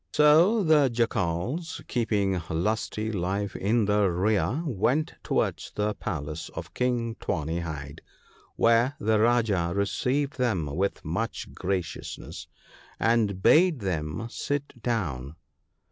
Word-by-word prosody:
"So 165 +9 +5
the 150 -5 +5
Jackals, 115 - -1
keeping 100 -6 0
Lusty 110 +5 -1
life 100 +1 -2
in 110 +3 +1
the 105 -1 +3
rear, 105 - +1
went 140 - 0
towards - - -1
the 105 0 0
palace 75 -3 -5
of - - -7
King 120 -2 0
Tawny 80 +2 -2
hide; 75 -4 -6 0.5
where 115 +4 +3
the 110 +1 +2
Rajah 110 -7 +2
received 130 +8 0
them 110 -11 +1
with 100 +3 -1
much 90 +9 -3
graciousness, 90 -3 -4 0.5
and 110 -5 +1
bade 165 -5 +5
them 80 0 -2
sit 140 0 -4
down. 80 - -2
105 Hz, 115 wpm, -27 LUFS, 90-125 Hz, 0.5 s, So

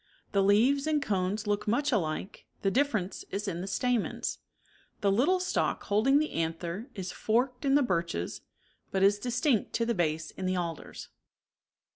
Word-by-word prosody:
The 200 - +3
leaves 240 +9 +4
and 310 -1 +2
cones 205 -4 -1
look 205 0 -1
much 285 +7 +1
alike, 180 -4 -2 0.2
the 195 - +2
differ 280 +1 +2
ence 185 0 -5
is 205 +1 -3
in 175 -3 -3
the 190 - -5
stamens. 245 +2 -1 0.6
The 200 - +3
little 290 - +3
stalk 365 - 0
holding 220 +7 +3
the 305 - +3
54 165 - -1
anther 170 - -4
is 190 -3 -4
forked 245 +4 0
in 275 0 +4
the 290 - +5
birches, 170 - -2 0.5
but 190 0 0
is 200 +1 +5
distinct 245 0 0
to 230 - +1
the 235 - +1
base 160 -4 -1
in 185 - -4
the 185 - +1
alders. 170 -3 -5
205 Hz, 175 wpm, -29 LUFS, 185-250 Hz, 0.6 s, the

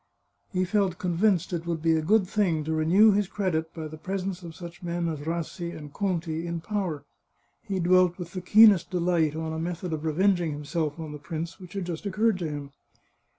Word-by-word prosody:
He 185 -2 +1
felt 190 -2 +1
convinced 180 0 +1
it 170 0 -3
would 170 -1 -1
be 165 +1 +2
a 160 - +1
good 195 +4 +3
thing 180 -7 +1
to 160 +1 -2
renew 175 +8 +5
his 205 -1 +1
credit 170 -6 -1
by 160 -2 -6
the 155 0 -10
presence 190 +2 -3
of 165 -2 -9
such 175 0 -10
men 170 -1 -2
as 160 -3 -3
Rassi 170 +1 -3
and 150 -2 -10
Conti 170 -4 -2
in 170 0 -3
power. 180 -6 -3 0.6
He 200 -4 -3
dwelt 180 0 +4
with 175 -2 -7
the 185 - -4
keenest 200 -2 +6
delight 170 -4 +1
on 160 0 -3
a 160 - -3
method 170 +1 -3
of 155 -1 -3
revenging 175 0 +2
himself 150 +1 -3
on 160 -2 -6
the 150 - -7
prince 165 +2 -5
which 180 -2 -11
had 195 -3 -3
just 175 +3 -4
occurred 210 0 +1
to 165 -3 -2
him. 145 -1 -6
170 Hz, 205 wpm, -27 LUFS, 160-185 Hz, 0.6 s, keenest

